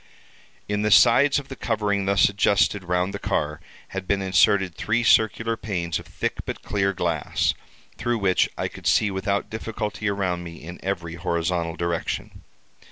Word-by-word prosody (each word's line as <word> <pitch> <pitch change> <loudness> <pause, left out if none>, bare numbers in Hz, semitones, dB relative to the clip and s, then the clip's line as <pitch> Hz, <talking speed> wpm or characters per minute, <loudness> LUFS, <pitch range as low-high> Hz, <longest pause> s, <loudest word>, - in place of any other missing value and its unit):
"In 105 0 -1
the 105 - +1
sides 130 +6 +6
of 140 -1 -4
the 135 - -7
covering 105 -5 -1
thus 100 +1 +4
adjusted 100 0 +2
round 90 +2 0
the - - -4
car, 75 +1 -2 0.3
had 95 -1 -5
been 100 - +1
inserted 95 0 +3
three 115 +7 0
circular 115 +1 +3
panes 85 -7 -3
of - - -12
thick - - -3
but - - -6
clear 100 0 0
glass, 85 -5 0 0.4
through 120 0 0
which 95 -3 +2
I - - -1
could - - -7
see 105 - +3
without 100 +1 -2
difficulty 110 -1 -3
around 95 -3 -1
me 85 -1 -8
in 85 +2 -10
every 90 -4 -3
horizontal 85 -1 -1
direction. 85 -1 -3
100 Hz, 165 wpm, -24 LUFS, 90-105 Hz, 0.4 s, sides